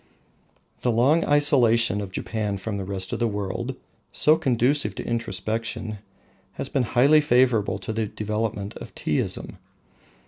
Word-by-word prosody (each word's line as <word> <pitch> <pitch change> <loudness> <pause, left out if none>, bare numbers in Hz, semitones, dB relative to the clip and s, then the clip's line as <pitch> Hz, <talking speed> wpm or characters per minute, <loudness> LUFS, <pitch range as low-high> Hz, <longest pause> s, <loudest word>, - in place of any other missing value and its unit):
The 125 - +1
long 135 +9 +3
isolation 120 -8 +4
of 100 -2 -6
Japan 105 0 -3
from 100 +1 -4
the - - -3
rest 95 -1 -4
of - - -2
the 120 - +2
world, 100 -3 -3 0.4
so 155 - +4
conducive 125 -5 +1
to - - -6
introspection, 110 -1 -3 0.5
has - - -5
been 135 - +1 0.2
highly 145 +5 +6
favourable 120 -8 +2
to 100 +3 -5
the 110 -1 -1
development 105 -1 -3
of - - -11
Teaism. - - -2
110 Hz, 140 wpm, -24 LUFS, 100-125 Hz, 0.5 s, highly